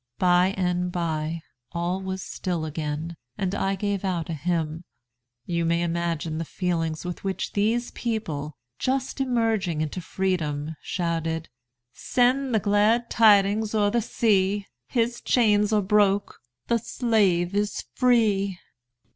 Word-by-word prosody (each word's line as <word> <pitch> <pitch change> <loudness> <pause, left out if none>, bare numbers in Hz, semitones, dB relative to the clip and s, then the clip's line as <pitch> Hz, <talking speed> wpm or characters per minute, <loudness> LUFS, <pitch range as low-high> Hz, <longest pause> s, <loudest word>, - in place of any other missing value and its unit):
By 180 +2 +3
and 180 -1 0
by 165 -2 -2 0.3
all 175 +2 -1
was 190 0 -4
still 175 -4 -3
again, 155 +1 -4 0.2
and 190 -1 -1
I 195 -1 0
gave 200 0 -2
out 175 -4 -2
a - - -1
hymn. 160 +1 -2 0.6
You 170 -1 -1
may 170 +1 +1
imagine 165 -2 -2
the - - -1
feelings 165 -2 -2
with 180 -1 -5
which 195 -1 -3
these 225 +4 +1
people, 160 - -3 0.2
just 265 +1 -1
emerging 225 -10 +1
into 155 +4 -3
freedom, 160 -5 -2
shouted 165 -2 -2 0.4
'Send 255 - +1
the - - +4
glad 210 +4 +2
tidings 210 0 +4
o'er 205 -1 +3
the 235 +1 +2
sea! 205 -3 +1 0.2
His 235 0 0
chains 210 -3 +3
are 210 -2 +3
broke, 205 0 +2 0.3
the 235 - +1
slave 200 -7 +1
is 205 0 -1
free!'" 210 -7 +2
190 Hz, 130 wpm, -25 LUFS, 170-215 Hz, 0.6 s, the